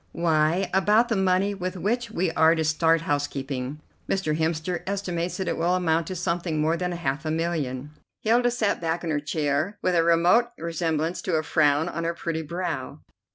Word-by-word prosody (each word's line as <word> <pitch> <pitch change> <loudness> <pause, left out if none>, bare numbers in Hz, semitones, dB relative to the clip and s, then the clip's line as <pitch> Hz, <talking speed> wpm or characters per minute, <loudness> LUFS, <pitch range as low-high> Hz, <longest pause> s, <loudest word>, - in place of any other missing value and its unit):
"Why, 165 +2 +2
about 210 +5 +4
the 225 - +1
money 190 +1 +2
with 185 -1 -4
which 230 +7 -1
we 185 -5 -1
are 160 0 +4
to 160 - 0
start 160 +1 +2
housekeeping. 145 -3 -3 0.3
Mr. 185 -6 0
Hemster 160 +2 -1
estimates 180 -3 -2
that 190 - -3
it - - -1
will 175 +2 +2
amount 165 -2 +1
to 185 - -4
something 170 -2 -1
more 160 +2 +2
than 180 +1 -2
half 150 -3 -2
a 155 - -3
million." 150 -5 -2 0.3
Hilda 240 +2 +3
sat 235 -6 0
back 165 +1 -1
in 165 - -2
her 150 - +1
chair 150 +5 -1
with 185 - +2
a 165 -1 +4
remote 170 +8 +4
resemblance 165 0 -2
to 180 - -1
a 155 - +1
frown 150 -1 +2
on 165 - -4
her 170 0 -1
pretty 165 -1 -3
brow. 170 +2 -4
170 Hz, 190 wpm, -25 LUFS, 155-185 Hz, 0.3 s, about